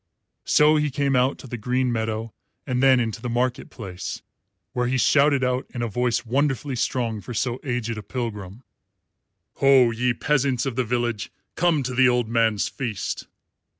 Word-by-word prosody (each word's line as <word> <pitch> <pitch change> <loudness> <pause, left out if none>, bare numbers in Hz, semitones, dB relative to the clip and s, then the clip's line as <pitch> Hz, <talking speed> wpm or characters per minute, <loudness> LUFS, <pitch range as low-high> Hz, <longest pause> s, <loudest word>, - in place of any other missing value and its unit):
So 150 +1 +5
he 150 0 +1
came 140 0 0
out 125 +2 +2
to - - -11
the 120 -1 -6
green 125 +3 0
meadow 110 -1 -3 0.3
and 125 -2 -1
then 135 -1 +5
into 115 -1 -2
the 125 - -4
market 120 +1 -1
place, 95 -6 -7 0.5
where 125 -1 0
he 130 +1 0
shouted 140 +1 +4
out, 125 0 0
in 120 - -2
a - - 0
voice 120 +2 0
wonderfully 135 +2 0
strong 115 -3 -1
for 120 +5 -8
so 125 +2 -1
aged 120 -4 -2
a - - -6
pilgrim, 105 -2 -6 0.9
"Ho, 135 -3 +5
ye 120 +1 0
peasants 135 -2 +1
of 135 -3 -3
the 130 - +1
village, 120 -2 -2 0.2
come 170 -5 +2
to 130 0 -3
the 130 0 +5
old 125 -2 +1
man's 115 -3 +2
feast." 115 -7 -4
125 Hz, 175 wpm, -24 LUFS, 115-130 Hz, 0.9 s, So